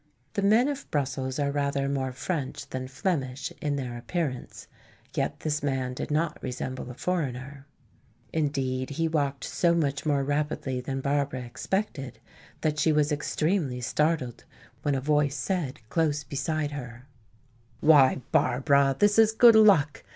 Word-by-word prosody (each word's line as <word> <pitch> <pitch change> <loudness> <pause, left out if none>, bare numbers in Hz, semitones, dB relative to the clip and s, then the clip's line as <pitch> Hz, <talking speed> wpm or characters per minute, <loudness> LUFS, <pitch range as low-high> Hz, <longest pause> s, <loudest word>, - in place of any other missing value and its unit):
The 200 - -1
men 220 +6 +4
of 285 -1 -4
Brussels 130 -2 -2
are 140 -1 0
rather 140 -1 0
more 135 -2 -1
French 140 +1 -4
than 130 0 -5
Flemish 140 0 -2
in 145 -1 0
their 125 -3 -4
appearance, 130 +1 -4 0.5
yet - - -2
this 150 -1 -1
man 130 -3 -1
did - - -5
not 150 +1 -1
resemble 130 0 -5
a 125 - -8
foreigner. 140 -5 -3 0.7
Indeed, 135 -4 -1
he 165 0 +2
walked 140 -3 -1
so 170 -1 +1
much 145 -4 0
more 145 -3 +1
rapidly 145 -2 -1
than 135 +1 -3
Barbara 140 -1 0
expected 130 - -3 0.4
that 150 -1 0
she 160 - +3
was 150 0 +2
extremely 150 -2 0
startled 140 -1 0 0.4
when 145 -1 0
a 135 - -1
voice 145 0 +2
said 145 - -3
close 150 -3 +1
beside 150 +2 -2
her: 125 -3 -8 0.7
"Why, 140 -4 +5
Barbara, 135 +2 +3
this 205 +1 +4
is 220 -1 +6
good 230 +1 +7
luck. 200 -10 +5
145 Hz, 145 wpm, -27 LUFS, 130-155 Hz, 0.7 s, good